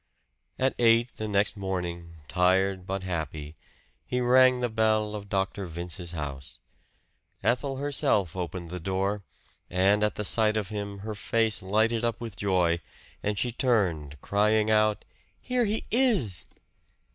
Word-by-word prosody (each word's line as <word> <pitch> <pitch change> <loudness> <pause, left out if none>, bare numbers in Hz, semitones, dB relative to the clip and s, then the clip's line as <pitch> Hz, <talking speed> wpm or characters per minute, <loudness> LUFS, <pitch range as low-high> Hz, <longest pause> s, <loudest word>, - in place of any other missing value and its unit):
At 130 +1 +1
eight 115 +1 +4
the 110 - -3
next 100 0 +1
morning, 90 -4 -4
tired 95 +1 +1
but 95 0 -3
happy, 80 -4 -4 0.5
he 125 - -2
rang 130 +1 +5
the 125 - 0
bell 110 -1 +1
of 100 -1 -7
Dr. 95 0 -1
Vince's 85 +1 -4
house. 70 -4 -6 0.8
Ethel 135 +2 0
herself 125 - 0
opened 90 -1 -5
the 90 - -4
door; 95 +3 -1 0.5
and 100 +4 +3
at 105 - +1
the 105 - -3
sight 110 +1 +4
of 105 -2 -2
him 100 -2 -5
her 110 - -3
face 110 +1 +1
lighted 110 +4 +1
up 115 -1 -1
with 115 -4 -7
joy, 90 -4 +1 0.4
and 105 0 -1
she 120 +5 0
turned, 90 - 0
crying 105 +1 +2
out, 110 -1 +2 0.3
"Here 250 -2 0
he 215 +1 -2
is!" 215 - +2
100 Hz, 145 wpm, -27 LUFS, 90-115 Hz, 0.8 s, rang